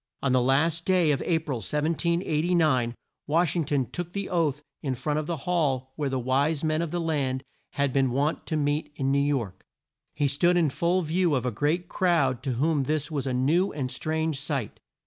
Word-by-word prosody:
On 140 - +2
the 130 0 +4
last 145 +6 +2
day 180 -4 +3
of 140 - 0
A 170 - +2
pril, 150 -5 -3
1789, 155 - +1 0.3
Wash 165 +1 +2
ing 165 -3 0
ton 140 -2 +1
took 175 +8 -6
the 200 -1 -3
oath 150 -5 0 0.2
in 135 -3 -2
front 150 +4 -1
of 155 - -4
the 170 - -1
hall 135 -7 0
where 145 -2 -1
the 135 - -1
wise 140 +5 +1
men 155 0 +1
of 170 - -2
the 175 - -2
land 140 -5 -1 0.3
had 140 -2 0
been 135 -2 +3
wont 140 +5 -1
to 160 - -1
meet 150 +1 -1
in 135 -1 0
New 140 - +3
York. 125 -10 -1 0.5
He 145 - +1
stood 175 +6 +2
in 160 -5 +2
full 175 +5 +1
view 165 0 +1
of 130 - -1
a 125 - 0
great 150 - 0
crowd 160 -10 +1
to 130 -1 -2
whom 145 +2 +1
this 150 +1 -1
was 140 -3 -2
a 130 - -1
new 160 +10 +2
and 135 -4 -3
strange 160 -2 -2
sight. 140 -7 -3
150 Hz, 205 wpm, -26 LUFS, 135-165 Hz, 0.5 s, the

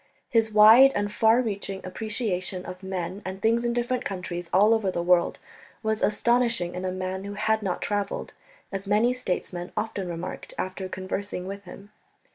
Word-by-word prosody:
His 225 -1 +2
wide 220 +6 +8
and 205 0 -1
far 225 +3 +4
reaching 195 -3 -4
appreciation 185 -2 -3
of 185 +1 -8
men 190 0 -4
and 190 0 -5
things 230 +3 +2
in 240 - +1
different 240 +1 -1
countries 175 -3 -5
all 205 +4 +5
over 220 -4 +1
the 170 -2 -2
world 175 0 +3 0.5
was 220 0 0
astonishing 230 -4 +2
in 180 +1 -5
a 185 - -1
man 185 +1 -4
who 200 0 -6
had 220 +1 +1
not 190 -4 -2
travelled, 205 -1 -2 0.4
as 195 0 -5
many 215 +5 +3
statesmen 180 -6 -4
often 210 -3 -2
remarked 175 +2 -6
after 185 0 -4
conversing 185 0 -4
with 200 +1 -7
him. 200 +3 -12
200 Hz, 170 wpm, -26 LUFS, 185-220 Hz, 0.5 s, wide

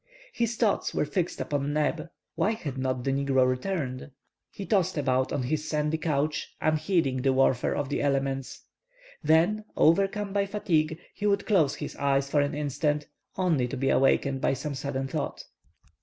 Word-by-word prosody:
His 235 0 -1
thoughts 220 -3 0
were - - +1
fixed 175 +3 -2
upon 145 -1 -1
Neb; 155 +2 -1 0.2
why 215 - +1
had 150 - -5
not 130 -1 -2
the 135 - 0
negro 135 -1 +2
returned? 130 0 -2 0.4
He 200 - -7
tossed 190 -6 +1
about 130 -2 +1
on 130 - -1
his 155 +4 -2
sandy 150 +1 0
couch, 150 -1 -1
unheeding 155 -3 +1
the 135 +1 +3
warfare 130 -2 +2
of 145 -2 -2
the 145 - -1
elements. 135 -1 -1 0.6
Then, 165 +8 +3
overcome 195 +4 +2
by 200 -1 +1
fatigue, 160 -6 0 0.2
he 210 - -2
would 200 -1 +1
close 165 -10 +3
his 150 - -6
eyes 140 0 +1
for 145 - +4
an 145 0 -1
instant, 150 +1 -1 0.3
only 165 -9 +2
to 135 - -5
be 135 +1 +1
awakened 135 0 +2
by - - +2
some 140 +3 -4
sudden 135 -1 -3
thought. 150 0 -4
150 Hz, 170 wpm, -27 LUFS, 135-170 Hz, 0.6 s, for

